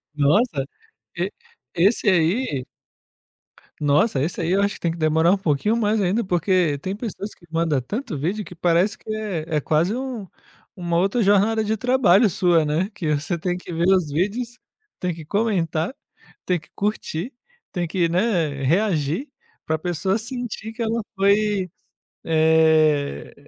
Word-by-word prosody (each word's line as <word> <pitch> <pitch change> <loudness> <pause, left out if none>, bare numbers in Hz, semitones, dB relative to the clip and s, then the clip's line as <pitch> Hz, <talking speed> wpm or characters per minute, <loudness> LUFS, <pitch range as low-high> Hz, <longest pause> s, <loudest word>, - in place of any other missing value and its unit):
Nossa, 150 - +2 0.5
e - - -1 0.5
esse 205 +5 +3
aí 170 - +1 1.2
Nossa, 145 - +2
esse 160 +4 -2
aí 165 0 -1
eu 195 +2 +3
acho 200 +1 0
que - - -12
tem 170 - 0
que 170 - -6
demorar 160 +2 +3
um 200 - +3
pouquinho 190 +5 +1
mais 220 -1 +1
ainda, 200 +5 +1
porque 175 -4 +1
tem 190 +7 -4
pessoas 215 -2 -6
que 170 - -21
manda 165 -5 0
tanto 210 - -4
vídeo 185 +8 -2
que 180 - -10
parece 175 +5 +2
que 215 - -6
é 205 -8 -3
é - - 0
quase 165 - +1
um 255 -6 -5 0.5
uma 170 -2 -1
outra 195 +6 +1
jornada 205 +2 +3
de 215 +1 -1
trabalho 240 -3 +4
sua, 175 -3 +2
né? 160 +6 0
Que 155 -4 -1
você 155 +4 -2
tem 180 +2 -2
que 180 - -9
ver 170 +2 0
os 180 -6 +3
vídeos, 230 - -2 0.4
tem 180 -1 -1
que 160 -1 -9
comentar, 185 - 0 0.5
tem 180 -2 +1
que 155 - -22
curtir, 205 - -2 0.4
tem 175 -3 -2
que, 170 0 0
né, 170 -7 0
reagir 170 - +1 0.4
para 160 - 0
pessoa 175 +4 -1
sentir 230 -1 -6
que 235 - -7
ela 230 +1 0 0.2
foi, 200 -1 +2 0.6
eh, 160 -2 +3
180 Hz, 160 wpm, -22 LUFS, 160-210 Hz, 1.2 s, trabalho